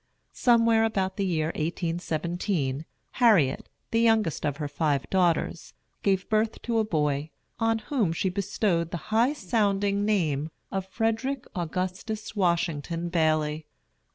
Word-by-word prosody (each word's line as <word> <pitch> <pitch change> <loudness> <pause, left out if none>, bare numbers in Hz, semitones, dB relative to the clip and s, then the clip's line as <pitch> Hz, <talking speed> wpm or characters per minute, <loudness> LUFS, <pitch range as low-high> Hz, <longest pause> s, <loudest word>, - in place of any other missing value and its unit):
Somewhere 230 -2 +4
about 190 -4 0
the 200 - 0
year 160 -3 0
1817, 165 -2 -2 0.4
Harriet, 185 - +4 0.2
the 230 - +2
youngest 220 -10 +2
of 145 -1 -2
her 150 -2 -3
five 145 -1 0
daughters, 175 -3 +1 0.3
gave 195 -2 +1
birth 220 +1 +1
to 230 -1 +1
a - - +3
boy, 150 -6 0 0.3
on 225 0 +2
whom 220 - 0
she 165 +3 -1
bestowed 185 -3 0
the 175 - -3 0.2
high 235 +6 +4
sounding 200 - +1
name 160 -8 +1 0.2
of 195 -1 -3
Frederick 225 +6 -1
Augustus 185 +6 -3
Washington 170 -3 0
Baily. 155 -2 +1
185 Hz, 125 wpm, -27 LUFS, 160-220 Hz, 0.4 s, Somewhere